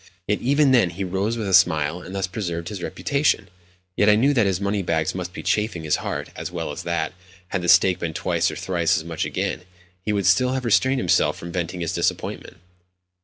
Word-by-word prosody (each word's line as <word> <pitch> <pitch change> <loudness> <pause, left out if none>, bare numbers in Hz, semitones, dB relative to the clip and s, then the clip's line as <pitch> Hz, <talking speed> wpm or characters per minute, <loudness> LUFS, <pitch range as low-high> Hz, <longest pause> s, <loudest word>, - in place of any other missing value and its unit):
Yet 105 - +1
even 140 +2 +3
then 120 -8 +4
he 90 +3 -5
rose 95 +5 -1
with 110 -3 -3
a 95 - -1
smile, 85 -2 +3
and 95 +2 -9
thus 95 - 0
preserved 85 -3 -4
his 100 -4 -6
reputation; 140 -3 0 0.5
yet 105 - +4
I 105 - +6
knew 135 +7 +3
that 115 -7 +3
his 95 -2 0
money 100 0 -1
bags 80 -3 0
must - - -5
be - - -8
chafing 105 -6 0
his 75 -1 +1
heart, - - -4
as - - -5
well - - -4
as - - -6
that, 85 -2 -2 0.4
had 95 - -2
the 85 - -1
stake 90 +1 +5
been 80 -2 -4
twice - - 0
or - - -6
thrice 85 -3 0
as - - -3
much 85 -1 -3
again, - - -2 0.4
he 105 - -2
would 100 -2 0
still 125 +8 +4
have 130 -1 -2
restrained 130 +5 +3
himself - - +2
from 85 - -8
venting 90 0 -3
his 85 0 -2
disappointment. - - -2
95 Hz, 220 wpm, -23 LUFS, 85-105 Hz, 0.5 s, I